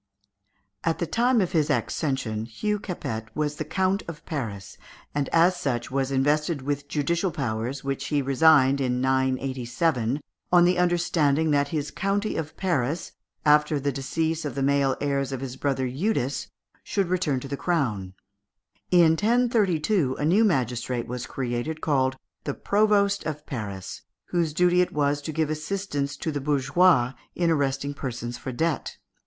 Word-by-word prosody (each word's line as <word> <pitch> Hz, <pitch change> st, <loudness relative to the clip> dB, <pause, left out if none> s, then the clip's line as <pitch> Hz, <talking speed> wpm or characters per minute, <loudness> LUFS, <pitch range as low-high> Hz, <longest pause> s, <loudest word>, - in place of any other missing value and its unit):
At 165 Hz, -, +1 dB
the 170 Hz, -, -1 dB
time 240 Hz, +5 st, +2 dB
of 185 Hz, -, -1 dB
his 155 Hz, -4 st, +1 dB
accession, 130 Hz, -7 st, -1 dB
Hugh 210 Hz, -, -2 dB
Capet 115 Hz, -, -4 dB
was 150 Hz, 0 st, -2 dB
Count 190 Hz, +1 st, +1 dB
of 165 Hz, -2 st, -8 dB
Paris, 105 Hz, -, -5 dB, 0.4 s
and 145 Hz, -2 st, -1 dB
as 175 Hz, +2 st, +4 dB
such 125 Hz, -8 st, -2 dB
was 135 Hz, 0 st, 0 dB
invested 145 Hz, +2 st, +1 dB
with 145 Hz, 0 st, -2 dB
judicial 170 Hz, +6 st, 0 dB
powers, 125 Hz, -2 st, -3 dB
which 135 Hz, 0 st, -3 dB
he 150 Hz, -, +1 dB
resigned 140 Hz, 0 st, +4 dB
in 125 Hz, -1 st, 0 dB
987, 130 Hz, 0 st, 0 dB, 0.3 s
on 175 Hz, -1 st, +6 dB
the 180 Hz, 0 st, +2 dB
understanding 160 Hz, -4 st, +2 dB
that 145 Hz, -1 st, +2 dB
his 150 Hz, 0 st, -3 dB
county 200 Hz, +2 st, -1 dB
of 155 Hz, -1 st, -4 dB
Paris, 165 Hz, -4 st, -1 dB, 0.3 s
after 150 Hz, 0 st, +4 dB
the 140 Hz, +1 st, 0 dB
decease 160 Hz, +4 st, -2 dB
of 145 Hz, -, -4 dB
the 135 Hz, -, -1 dB
male 140 Hz, -1 st, +2 dB
heirs 140 Hz, -2 st, -1 dB
of 135 Hz, -, -3 dB
his 130 Hz, -1 st, -5 dB
brother 135 Hz, -1 st, -1 dB
Eudes, 140 Hz, -, -1 dB, 0.4 s
should 195 Hz, -3 st, 0 dB
return 170 Hz, -7 st, +1 dB
to 140 Hz, -, -8 dB
the 140 Hz, -, -3 dB
crown. 115 Hz, -, -1 dB, 0.7 s
In 170 Hz, -3 st, +6 dB
1032, 205 Hz, -, +2 dB
a 150 Hz, -, -1 dB
new 190 Hz, +8 st, +4 dB
magistrate 125 Hz, -, 0 dB
was 125 Hz, 0 st, -5 dB
created, 130 Hz, +5 st, -3 dB
called 130 Hz, -4 st, +1 dB, 0.3 s
the 140 Hz, -, -3 dB
Provost 200 Hz, -1 st, +2 dB
of 150 Hz, -1 st, -5 dB
Paris, 100 Hz, -8 st, -6 dB, 0.3 s
whose 170 Hz, -3 st, +1 dB
duty 180 Hz, +3 st, +3 dB
it 180 Hz, -, 0 dB
was 145 Hz, -1 st, +1 dB
to 150 Hz, -, -4 dB
give 155 Hz, 0 st, 0 dB
assistance 155 Hz, -3 st, -3 dB
to 160 Hz, -, -2 dB
the 145 Hz, -1 st, -3 dB
bourgeois 135 Hz, -1 st, +3 dB, 0.2 s
in 170 Hz, -2 st, +2 dB
arresting 140 Hz, -1 st, 0 dB
persons 120 Hz, -3 st, -5 dB
for 130 Hz, -, -5 dB
debt. 160 Hz, +4 st, -2 dB
145 Hz, 155 wpm, -25 LUFS, 130-170 Hz, 0.7 s, on